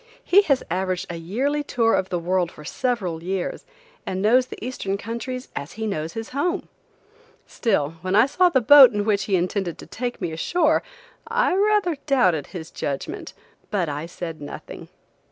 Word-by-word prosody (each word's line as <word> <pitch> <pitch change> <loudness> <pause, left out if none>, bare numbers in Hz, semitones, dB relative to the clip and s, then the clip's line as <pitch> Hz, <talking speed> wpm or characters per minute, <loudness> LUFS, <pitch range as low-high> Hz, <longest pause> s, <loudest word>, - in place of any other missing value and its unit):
He 395 +3 +6
has 275 -2 +3
averaged 185 0 -1
a - - -5
yearly 255 - -1
tour 230 -5 +1
of 190 - +1
the 180 - -1
world 175 0 0
for 150 - -13
several 190 - -2
years, 185 +1 -3 0.4
and 185 - -3
knows 245 +6 +4
the - - -8
eastern 210 -5 -3
countries 235 +4 -5
as 145 +4 -5
he 220 0 -4
knows 160 -6 -3
his 225 0 -6
home. 350 +8 -2 0.8
Still, 165 - -1
when 185 +2 -1
I 225 - +7
saw 360 +6 +3
the 260 -6 +2
boat 265 +1 +9
in 205 0 -1
which 205 -2 +1
he 195 - +1
intended 180 0 -1
to - - -10
take 245 0 -4
me 175 -4 -3
ashore, 315 - +2 0.5
I 465 -1 +2
rather 400 -4 +2
doubted 185 - +2
his 165 -3 -8
judgment, 140 -1 -4 0.4
but 185 -6 0
I 150 +3 -4
said 165 -3 -7
nothing. 145 - -9
205 Hz, 175 wpm, -23 LUFS, 175-260 Hz, 0.8 s, boat